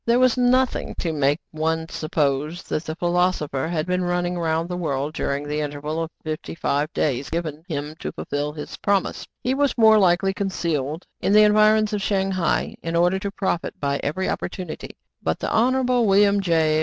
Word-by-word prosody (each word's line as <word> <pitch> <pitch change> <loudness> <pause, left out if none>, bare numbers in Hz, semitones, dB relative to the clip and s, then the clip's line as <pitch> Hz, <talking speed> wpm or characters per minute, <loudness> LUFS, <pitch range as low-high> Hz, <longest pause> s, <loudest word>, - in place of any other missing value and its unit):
There 235 +1 +3
was 255 -1 +4
nothing 255 0 +2
to 165 -2 -2
make 145 -1 +2
one 160 +1 -1
suppose 155 +1 -1
that 155 - -3
the 155 - -4
philosopher 175 -5 0
had 160 -2 -1
been 180 0 0
running 175 0 0
round 165 -1 0
the 180 - -4
world 150 -4 -2
during 140 -2 -2
the 150 +1 -2
interval 150 +2 -3
of 165 - -3
fifty 155 0 -5
five 150 -1 0
days 140 -3 -1
given 160 -2 -3
him 150 -3 -4
to - - -4
fulfil 145 +1 -3
his 150 0 -8
promise: 200 -2 0 0.2
he 255 - +1
was 280 0 +1
more 220 -2 +7
likely 190 0 +3
concealed 165 -6 -2
in 200 - +1
the 215 0 +8
environs 215 0 +4
of 205 - -1
Shang 195 -1 0
hai, 185 -3 0
in 165 0 -3
order 175 +3 +3
to 200 - -3
profit 190 -4 -2
by 140 -1 -1
every 185 +6 -2
opportunity; 180 -3 -5 0.2
but 80 - -1
the - - -3
Honorable 250 0 +2
William 200 +1 +4
J. 160 -4 +2
170 Hz, 185 wpm, -23 LUFS, 155-200 Hz, 0.2 s, the